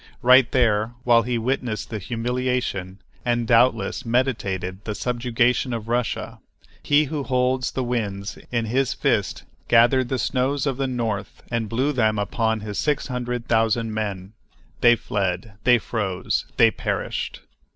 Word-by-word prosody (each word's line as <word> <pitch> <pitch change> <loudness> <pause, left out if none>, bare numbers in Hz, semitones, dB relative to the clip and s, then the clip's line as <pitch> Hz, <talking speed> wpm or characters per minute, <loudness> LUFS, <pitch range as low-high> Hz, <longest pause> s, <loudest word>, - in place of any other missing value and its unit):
Right 130 0 +6
there, 115 -2 +2
while 120 -2 +5
he 120 +1 -1
witnessed 120 -2 -2
the 110 - -3
humiliation 120 -4 -2 0.3
and 120 -1 0
doubtless 120 +2 +3
meditated 105 -7 -1
the 105 - -4
subjugation 125 +1 0
of 115 -1 -4
Russia, 120 0 -2 0.4
He 145 +1 +3
who 150 0 -3
holds 130 -1 0
the 130 - -3
winds 105 -5 -3
in 115 -2 0
His 130 +4 0
fist 65 - 0 0.2
gathered 120 +2 +4
the 130 - 0
snows 135 +3 0
of 135 -3 -1
the 135 -1 -1
north 110 -5 -3
and 115 -3 -1
blew 130 +6 +1
them 110 -4 +2
upon 110 +2 0
his 105 -1 -4
six 150 -1 0
hundred 125 -1 -3
thousand 115 0 +1
men; 100 -2 -4 0.5
they 120 -1 +6
fled—they 105 +4 0
froze—they 105 -5 0
perished. - - -3
120 Hz, 140 wpm, -23 LUFS, 110-125 Hz, 0.5 s, Right